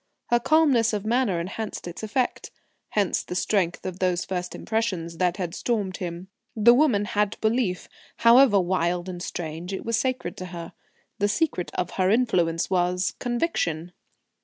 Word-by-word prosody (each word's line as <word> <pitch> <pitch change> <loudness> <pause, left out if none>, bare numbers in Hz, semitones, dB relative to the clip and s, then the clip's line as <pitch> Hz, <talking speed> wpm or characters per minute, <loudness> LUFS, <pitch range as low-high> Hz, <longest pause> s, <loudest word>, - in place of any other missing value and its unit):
Her 240 - +5
calmness 260 -5 +3
of 210 -1 -2
manner 230 -6 +1
enhanced 195 +3 -5
its 175 - -7
effect. 225 +4 -1 0.4
Hence 200 -4 +1
the 180 - -7
strength 185 -2 0
of 185 0 -5
those 180 -2 0
first 180 -1 -4
impressions 190 -7 -2
that 180 0 +1
had 175 -3 -3
stormed 205 -6 -1
him. 175 0 -6 0.3
The 230 +2 +6
woman 245 -7 +3
had 210 0 -1
belief; 220 -5 0 0.3
however 235 -2 +6
wild 175 -1 0
and 180 -1 -6
strange, 170 +1 -5
it 190 - -5
was 230 -1 +1
sacred 255 -9 -2
to 185 - -6
her. 170 -2 -8 0.5
The 205 - +3
secret 210 - 0
of 180 -1 -2
her 185 -1 +3
influence 180 -8 +2
was 180 0 +1
conviction. 210 - -1
190 Hz, 160 wpm, -25 LUFS, 175-230 Hz, 0.5 s, The